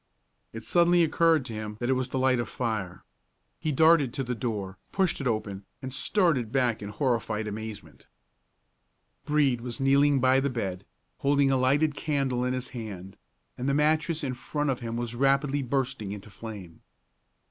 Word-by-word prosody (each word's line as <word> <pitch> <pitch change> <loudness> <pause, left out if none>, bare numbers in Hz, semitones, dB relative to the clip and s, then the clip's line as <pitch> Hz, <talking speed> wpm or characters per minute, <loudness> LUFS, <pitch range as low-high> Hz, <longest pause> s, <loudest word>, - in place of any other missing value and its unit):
It 115 0 -8
suddenly 175 +3 +4
occurred 165 -2 +3
to 115 - -7
him 105 -1 -6
that 120 - -2
it 130 - +3
was 130 0 -1
the 130 - -3
light 130 -1 +3
of 120 -2 -3
fire. 105 -7 -3 0.6
He 155 - -1
darted 155 -3 +4
to 135 - -1
the 125 0 -2
door, 105 -5 -4
pushed 190 -6 +1
it 135 - -1
open, 105 -4 -2 0.2
and 130 -1 -6
started 135 - +1
back 125 -4 +1
in 100 - -5
horrified 110 -2 -1
amazement. 110 0 -8 1.2
Brede 145 -5 +2
was 120 +2 -5
kneeling 140 +1 +4
by 130 +1 +4
the 140 +1 0
bed, 100 -6 -4 0.3
holding 140 -1 +3
a 135 - +3
lighted 145 +4 +2
candle 135 -5 -1
in 125 0 0
his 125 0 -4
hand, 100 -6 -7 0.4
and 130 +3 -1
the 140 - +2
mattress 155 +2 +1
in 130 -2 -1
front 145 +3 -2
of 130 - -3
him 115 -1 -4
was 120 -1 -3
rapidly 140 +2 +2
bursting 130 -5 -2
into 105 0 -10
flame. 100 -7 -9
130 Hz, 175 wpm, -27 LUFS, 110-140 Hz, 1.2 s, suddenly